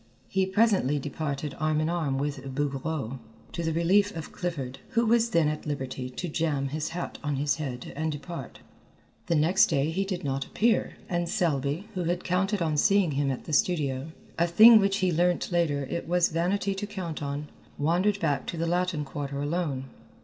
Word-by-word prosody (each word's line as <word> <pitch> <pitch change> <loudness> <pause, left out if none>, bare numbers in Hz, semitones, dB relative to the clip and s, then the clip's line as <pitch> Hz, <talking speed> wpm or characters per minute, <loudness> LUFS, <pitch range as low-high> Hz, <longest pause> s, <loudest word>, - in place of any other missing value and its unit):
He 190 -1 +1
presently 190 - +3
departed 145 0 -3
arm 155 0 +1
in 155 - +1
arm 160 -6 -1
with 135 -2 -4
Bouguereau, 140 -2 -2 0.3
to 170 - -4
the 160 - 0
relief 185 +5 +3
of 160 - -6
Clifford, 140 -8 -4
who 235 +1 +3
was 235 +1 +3
then 170 -7 +3
at 150 0 -3
liberty 130 -3 -4
to 175 +8 -5
jam 150 -4 -1
his 150 +2 -3
hat 175 +1 -5
on 145 -1 -1
his 145 +3 0
head 130 -5 -5
and 160 +2 -1
depart. 145 -3 -7 0.7
The 170 - +2
next 160 +5 +4
day 140 +3 +1
he 190 +4 0
did 190 -3 -4
not 135 -1 -1
appear, 225 - +1
and 175 -2 -1
Selby, 160 -1 0
who 180 -3 -2
had 175 +1 -1
counted 190 +1 0
on 155 -2 0
seeing 195 0 +4
him 140 0 0
at 130 - -3
the 155 - -6
studio, 150 -5 +1 0.3
a 170 - +4
thing 220 +6 +9
which 195 -1 +2
he 180 - +2
learned 175 +2 +2
later 155 -5 +1
it 170 +5 -4
was 175 0 +3
vanity 185 +4 0
to 200 +2 -4
count 185 -7 -5
on, 145 +1 -4 0.3
wandered 180 +7 +2
back 150 -6 0
to 170 - -4
the 165 - 0
Latin 175 -3 0
Quarter 140 0 -5
alone. 145 -3 -2
160 Hz, 190 wpm, -27 LUFS, 145-180 Hz, 0.7 s, thing